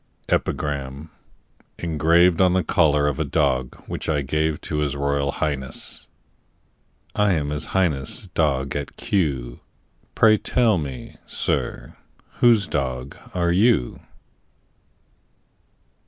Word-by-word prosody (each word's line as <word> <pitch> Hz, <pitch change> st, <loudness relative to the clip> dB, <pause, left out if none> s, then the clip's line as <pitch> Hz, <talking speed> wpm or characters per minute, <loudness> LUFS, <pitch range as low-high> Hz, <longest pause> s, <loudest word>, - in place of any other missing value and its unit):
EPIGRAM, 70 Hz, +1 st, -2 dB, 0.7 s
ENGRAVED 85 Hz, +2 st, +3 dB
ON 90 Hz, -1 st, +4 dB
THE 95 Hz, -1 st, +2 dB
COLLAR 75 Hz, -3 st, +3 dB
OF 70 Hz, -3 st, -2 dB
A -, -, +2 dB
DOG 65 Hz, -5 st, 0 dB
WHICH -, -, -5 dB
I 75 Hz, -3 st, +1 dB
GAVE 75 Hz, +3 st, 0 dB
TO 75 Hz, -, -4 dB
HIS 75 Hz, -1 st, -1 dB
ROYAL 70 Hz, 0 st, 0 dB
HIGHNESS. 70 Hz, -4 st, -3 dB, 1.1 s
I 105 Hz, -2 st, +2 dB
am 75 Hz, -3 st, -1 dB
His 75 Hz, +1 st, -1 dB
Highness' 90 Hz, -, 0 dB
dog 70 Hz, -4 st, 0 dB
at 70 Hz, -1 st, -5 dB
Kew; 65 Hz, -11 st, -1 dB, 0.6 s
Pray 110 Hz, -1 st, +5 dB
tell 115 Hz, -4 st, +2 dB
me, 70 Hz, -4 st, -7 dB
sir, -, -, -2 dB, 0.4 s
whose 115 Hz, -6 st, +5 dB
dog 65 Hz, -3 st, -3 dB, 0.2 s
are 85 Hz, -1 st, +1 dB
you? 100 Hz, -, +2 dB
75 Hz, 110 wpm, -23 LUFS, 70-85 Hz, 1.1 s, Pray